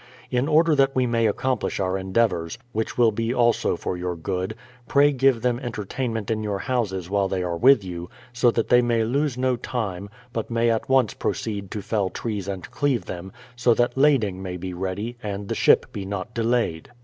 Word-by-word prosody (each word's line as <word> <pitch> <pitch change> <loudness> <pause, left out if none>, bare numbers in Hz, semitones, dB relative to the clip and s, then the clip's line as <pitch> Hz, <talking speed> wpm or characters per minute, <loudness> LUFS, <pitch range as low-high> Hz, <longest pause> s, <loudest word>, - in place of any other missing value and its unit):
In 125 +2 +1
order 160 +1 +4
that 135 -1 +3
we 130 -1 +3
may 115 -2 +2
accomplish 125 +3 -1
our 95 -1 0
endeavours, 95 -1 0
which 110 0 -3
will 120 -2 +5
be 115 +2 -1
also 120 -1 +2
for - - -3
your 90 0 -3
good, 95 +4 -3 0.3
pray 145 +1 +5
give 135 -3 +2
them 120 -1 +1
entertainment 115 -2 -3
in 110 -1 0
your 105 -2 -2
houses 95 -6 -2
while 100 0 +1
they 95 -1 -2
are 85 -1 -2
with 125 +4 +5
you, 90 -1 -6 0.2
so 120 +1 +4
that 115 -1 -1
they 125 0 +6
may 120 -2 +1
lose 135 +3 0
no 130 0 +1
time, 100 -6 -4 0.2
but 115 - -3
may 115 0 +2
at 115 +2 -2
once 130 -5 +3
proceed 100 -3 -3
to 105 0 -5
fell 100 -3 0
trees 105 -2 -4
and 95 -2 -5
cleave 140 -5 0
them, 95 +1 -7 0.2
so 120 -1 +3
that 120 0 +1
lading 130 -10 +3
may 90 -1 -5
be 90 +1 -5
ready, 95 +6 -4
and 100 -1 -4
the - - 0
ship - - +4
be 100 - -5
not 100 +3 -5
delayed. 115 -8 0
110 Hz, 200 wpm, -24 LUFS, 95-125 Hz, 0.3 s, they